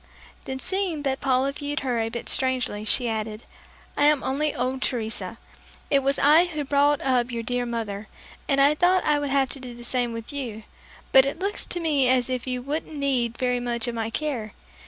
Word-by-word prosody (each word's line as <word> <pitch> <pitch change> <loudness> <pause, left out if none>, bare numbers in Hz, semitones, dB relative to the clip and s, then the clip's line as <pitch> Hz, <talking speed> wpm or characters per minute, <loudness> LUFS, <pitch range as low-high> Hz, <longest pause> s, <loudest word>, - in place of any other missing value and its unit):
Then, 265 - -4
seeing 365 -1 -2
that 270 -1 -1
Paula 265 0 +2
viewed 290 +2 -4
her 250 -4 -1
a 225 0 0
bit 235 +1 -6
strangely, 255 -5 0
she 240 +3 +4
added, 220 0 -3 0.5
"I 290 - +3
am 300 -2 +4
only 290 +3 0
old 260 0 -1
Teresa. 225 -4 -2 0.5
It 280 - +5
was 275 +1 0
I 305 +5 +6
who 305 -4 -4
brought 285 +1 +3
up 255 -2 +1
your 230 -1 -3
dear 245 +1 -1
mother, 215 -3 -4 0.4
and 275 -1 +3
I 280 +2 +6
thought 360 +4 +3
I 300 -1 +3
would 290 -1 -2
have 270 -1 +2
to 275 - -5
do 250 -2 -8
the 240 - -11
same 245 0 0
with 230 +4 -7
you; 235 -6 -5 0.5
but 265 0 +7
it 280 - -3
looks 395 +3 -3
to 350 - -2
me 290 -6 +2
as 255 0 +3
if 255 0 -3
you 250 -1 -2
wouldn't 300 +3 -4
need 255 -5 0
very 250 -1 0
much 240 -1 -1
of 240 - -2
my 225 -1 -2
care. 240 -6 -3
260 Hz, 210 wpm, -25 LUFS, 240-290 Hz, 0.5 s, but